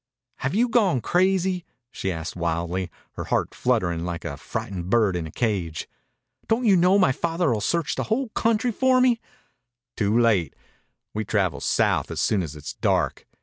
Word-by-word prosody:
"Have 130 +7 -2
you 240 +3 +3
gone 210 - +3
crazy?" 185 - +1 0.3
she 95 - -3
asked 80 -1 -5
wildly, 85 +2 -2 0.2
her - - -6
heart - - 0
fluttering 85 -2 0
like 85 -1 -4
a 70 - -4
frightened 95 +2 -5
bird 105 -4 +3
in 85 -2 -3
a - - -10
cage. 95 -9 -2 0.6
"Don't 235 +2 +1
you 200 -3 +6
know 180 +2 +5
my 185 -9 +4
father 165 +2 0
will 105 - -2
search 165 +8 0
the - - -2
whole 240 +3 -1
country 230 +2 +1
for 255 +3 +3
me?" 250 -2 +3 0.7
"Too 105 +1 +1
late. 105 - +2 0.6
We 110 - -2
travel 100 -5 0
south - - +1
soon 105 - +2
as 80 -4 -5
it's 75 -1 -7
dark." - - 0
115 Hz, 170 wpm, -24 LUFS, -, 0.7 s, you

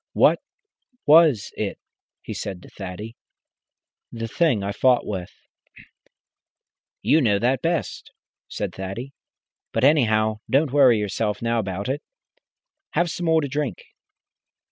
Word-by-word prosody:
"What - - +4 0.7
was 150 -8 +5
it?" 105 -2 -3 0.5
he - - -6
said 95 -3 -6
to - - -14
Thaddy 100 +3 -8 1.0
"the 115 -1 -5
Thing 120 -3 +1
I 100 - -2
fought 125 +3 +3
with?". 95 -4 -4 1.7
"You 160 - +4
know 105 -6 +3
that 125 +4 +1
best," 165 -1 -2 0.4
said 100 -3 -4
Thaddy. 95 +9 -6 0.6
"But, 115 - -1
anyhow, 110 -7 +3
don't 135 0 +2
worry 130 -5 +6
yourself 105 +1 -2
now 115 0 +1
about 100 0 -3
it. 140 +3 -2 0.9
Have 175 -1 +1
some 175 +1 -3
more 160 0 +4
to 145 - -2
drink." 140 - -2
115 Hz, 125 wpm, -23 LUFS, 105-145 Hz, 1.7 s, worry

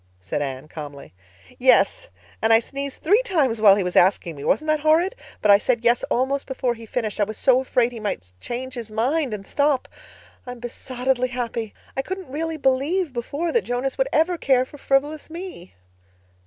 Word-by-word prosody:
said 90 +10 -3
Anne 135 0 -4
calmly. 145 - -9 0.5
"Yes. - - +3 0.3
And 225 - +3
I 225 - +7
sneezed 275 +3 -6
three 410 +9 +4
times 290 - 0
while 200 -3 +8
he 200 - 0
was 180 0 -3
asking 175 -3 +3
me. 140 - -9
Wasn't 310 - +1
that 310 0 +2
horrid? 320 +7 +3 0.3
But 210 - +6
I 200 - +7
said 235 +1 0
'yes' 240 0 +4
almost 270 +3 0
before 255 -2 -1
he 230 -1 -12
finished—I 215 -3 -1
was 215 +1 -4
so 260 -2 +4
afraid 245 -2 +1
he 235 - -8
might 90 - -4
change 255 - -5
his 235 -3 -6
mind 255 +6 0
and 205 -2 -5
stop. 285 +1 +1 0.6
I'm 245 -1 -7
besottedly 250 +1 -2
happy. 235 -3 -4 0.2
I 270 - 0
couldn't 375 -1 -6
really 320 +2 -3
believe 285 +4 +1
before 285 +7 -3
that 470 - +3
Jonas 250 - -2
would - - +2
ever 335 +2 +2
care 255 -2 +3
for 290 +2 -14
frivolous 290 +4 0
me." 335 - -9
255 Hz, 185 wpm, -23 LUFS, 225-295 Hz, 0.6 s, while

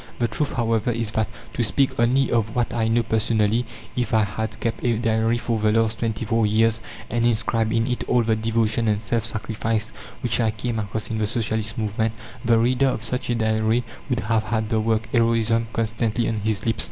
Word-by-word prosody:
The 120 - +1
truth, 150 +4 -2
however, 115 -1 +1
is 115 -2 -1
that 110 -1 0 0.3
to - - -1
speak 135 +5 +2
only 130 +3 +3
of 110 -2 0
what 120 -1 0
I 115 -2 +1
know 115 +1 +2
personally 110 +1 +1 0.3
if 120 -3 0
I 110 - +4
had 110 +1 -4
kept 115 - -2
a 120 -2 +2
diary 115 0 +1
for 115 -1 -1
the 105 0 +2
last 115 0 +1
twenty 115 -1 -2
four 115 0 +2
years 110 +1 +2 0.3
and 120 0 +1
inscribed 115 -1 +1
in 115 -1 +2
it 125 0 -2
all 125 -1 +4
the 110 0 +2
devotion 115 +1 +1
and 105 -1 +2
self 115 0 -1
sacrifice 110 0 -2 0.3
which 120 -1 +1
I 115 -2 +3
came 115 +1 -3
across 110 +2 -4
in 110 - -1
the 105 - +1
Socialist 110 -1 -2
movement, 110 +1 -1 0.3
the 115 -1 +4
reader 125 +4 +3
of 125 -4 -1
such 125 +2 -2
a 120 - +2
diary 110 +1 +1 0.3
would 125 -1 0
have 110 0 0
had 110 -2 -1
the 110 - +1
word 110 0 +1
"heroism" 115 -1 +2
constantly 115 0 -1
on 110 - -1
his 105 0 -1
lips. 115 - 0
115 Hz, 210 wpm, -23 LUFS, 110-115 Hz, 0.3 s, I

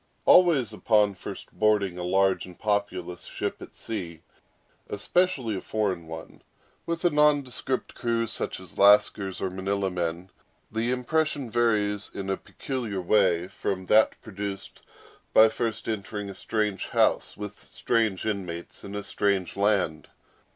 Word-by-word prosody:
Always 150 - +5
upon 105 -2 +3
first 90 - -9
boarding 100 -4 +1
a - - -3
large 95 +1 +2
and 90 - -13
populous 95 -4 -2
ship - - -4
at - - -11
sea, 85 -8 -5 0.7
especially 130 - +1
a 95 - -4
foreign 95 -6 -2
one, 80 0 -9 0.5
with 170 +1 -2
a 175 - +5
nondescript 145 -3 +1
crew 115 -1 0
such 110 - -3
as 95 -3 -12
Lascars 100 -1 +4
or 95 - -1
Manilla 95 +1 -1
men, 90 +1 -3 0.4
the 115 +2 -1
impression 135 0 0
varies 105 -4 +1
in 95 0 -4
a - - +1
peculiar 120 -8 -4
way 90 -2 +2
from 95 -1 -3
that 110 +3 +4
produced 100 -2 -6 0.5
by 110 0 +8
first 110 -1 -3
entering 105 -2 -4
a - - -8
strange 105 -2 -2
house - - +1
with 105 0 -8
strange 110 -5 0
inmates 90 -5 -4
in 100 +1 -7
a 105 - -3
strange 100 -4 0
land. 100 -6 +1
105 Hz, 140 wpm, -27 LUFS, 95-115 Hz, 0.7 s, by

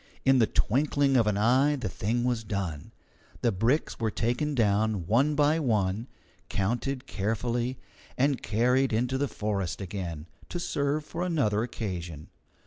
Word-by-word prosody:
In 135 -1 +5
the 110 - +4
twinkling 140 +2 +2
of 115 -4 +4
an 105 -1 +1
eye 130 +7 +4
the 125 -6 -3
thing 110 +7 -1
was 120 -2 0
done. 95 -8 -4 0.5
The 120 - +3
bricks 115 +10 0
were 115 -2 +1
taken 120 +7 -1
down 105 -4 +1
one 135 - +3
by 150 +2 +3
one, 110 -4 0 0.4
counted 120 +6 -1
carefully, 120 +4 -2 0.4
and 135 -1 +2
carried 125 +3 +2
into 125 +4 0
the 145 - +1
forest 100 -6 -2
again, 90 -5 -5 0.2
to 175 - -4
serve 145 -2 -1
for 165 - -5
another 135 -13 +1
occasion. 90 -9 -5
115 Hz, 145 wpm, -28 LUFS, 105-135 Hz, 0.5 s, In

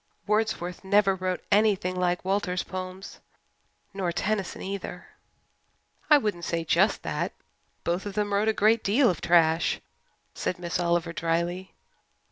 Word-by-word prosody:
Wordsworth 210 -5 -1
never 195 0 +4
wrote 185 -1 -3
anything 200 -3 +3
like 180 0 0
Walter's 190 -2 0
poems 185 +1 -7 0.7
nor 190 -3 -1
Tennyson, 195 +2 -2
either." 190 -2 -6 1.0
"I 300 - +8
wouldn't 210 -10 -2
say 170 -1 -1
just 180 +6 +2
that. - - -2 0.5
Both 175 +4 -1
of 200 - -6
them 205 -1 -1
wrote 205 +2 +2
a - - +5
great 215 +2 +3
deal 235 +4 +4
of 175 - -6
trash," 165 -1 +3 0.5
said 180 - -2
Miss 175 0 -3
Oliver 170 -1 0
dryly. 170 +3 -2
185 Hz, 135 wpm, -27 LUFS, 175-205 Hz, 1.0 s, I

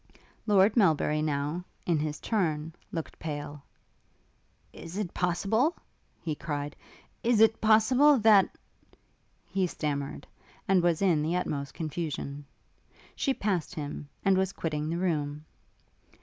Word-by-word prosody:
Lord 205 0 +5
Melbury 155 - +3
now, 150 +3 -1 0.2
in 165 -3 +2
his 150 0 -3
turn, 160 -7 -1 0.2
looked 165 -2 -5
pale. 145 -2 -5 1.1
'Is 170 +3 -8
it 205 -5 -3
possible 200 - +1 0.2
' - - -40
he 160 - 0
cried, 145 -1 -4 0.5
'Is 235 -2 +2
it 225 0 +5
possible, 250 +7 +5
that 210 -4 +5 0.4
' - - -41
He 190 -1 +2
stammered, 140 -4 -3 0.4
and 190 -2 +4
was 175 +1 +1
in 170 -6 +3
the 160 +3 0
utmost 140 -6 -3
confusion. 150 -3 -4 0.7
She 275 - 0
passed 195 - -1
him, 145 -1 -6 0.2
and 190 -1 +4
was 190 0 0
quitting 155 -2 -3
the 165 - -1
room. 150 -4 -1
170 Hz, 130 wpm, -29 LUFS, 150-195 Hz, 1.1 s, Lord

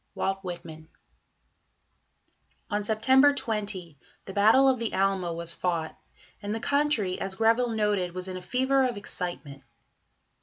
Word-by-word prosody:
WALT 195 0 -1
WHITMAN. 165 -3 -8 1.8
On 205 0 0
September 260 +7 +4
20 200 - -4 0.3
the 195 - -8
Battle 220 +7 +5
of 260 -2 +3
the 230 -1 -3
Alma 190 -2 +1
was 170 0 -2
fought, 170 -3 -2 0.5
and 205 +1 -3
the - - -3
country, 280 -8 0
as 195 0 -2
Greville 230 +3 +2
noted, 210 -5 0
was 185 0 -4
"in 185 - -5
a 185 - -6
fever 260 +6 +1
of 245 -4 -1
excitement." 175 -8 -5
205 Hz, 140 wpm, -27 LUFS, 180-230 Hz, 1.8 s, Battle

